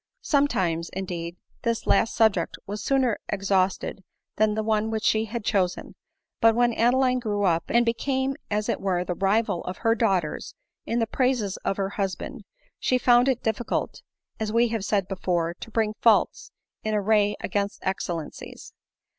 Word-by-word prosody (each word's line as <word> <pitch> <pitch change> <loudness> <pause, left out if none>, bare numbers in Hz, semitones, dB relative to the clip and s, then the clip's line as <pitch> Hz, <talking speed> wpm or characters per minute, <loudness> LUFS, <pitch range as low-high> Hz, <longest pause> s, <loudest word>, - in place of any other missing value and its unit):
Sometimes, 185 - +1
indeed, 175 -2 -5 0.2
this 230 -1 -1
last 225 - +2
subject 220 -3 +2
was 205 +1 -5
sooner 260 -5 +1
ex 195 -1 -3
hausted 190 0 +1 0.4
than 215 -1 +3
the 220 - -1
one 215 0 +1
which 220 0 -2
she 220 0 +2
had 225 0 -5
chosen; 185 -4 0 0.5
but 225 -1 +5
when 240 0 +3
Adeline 250 +2 +3
grew 205 -4 -1
up, 170 -3 +2
and 235 0 +3
became 265 +3 0
as 210 0 -1
it - - -1
were 185 -2 0
the 180 - -2
rival 195 0 +1
of 180 - -5
her 225 -1 +2
daughters 195 -9 -1 0.3
in 230 - 0
the 230 - +2
praises 245 -5 0
of 195 - -2
her 195 -1 -1
husband, 200 - -4 0.3
she 255 - +2
found 245 0 +4
it 260 -3 0
difficult, 220 +1 -2 0.4
as 215 -1 -2
we 235 +1 +3
have 225 -3 -2
said 200 -2 0
before, 175 -3 -1
to - - -8
bring 220 -1 0
faults 225 -2 +3 0.3
in 215 0 -1
array 205 0 +2
against 200 +1 -2
excellencies. 175 -4 -5
215 Hz, 165 wpm, -25 LUFS, 195-235 Hz, 0.5 s, but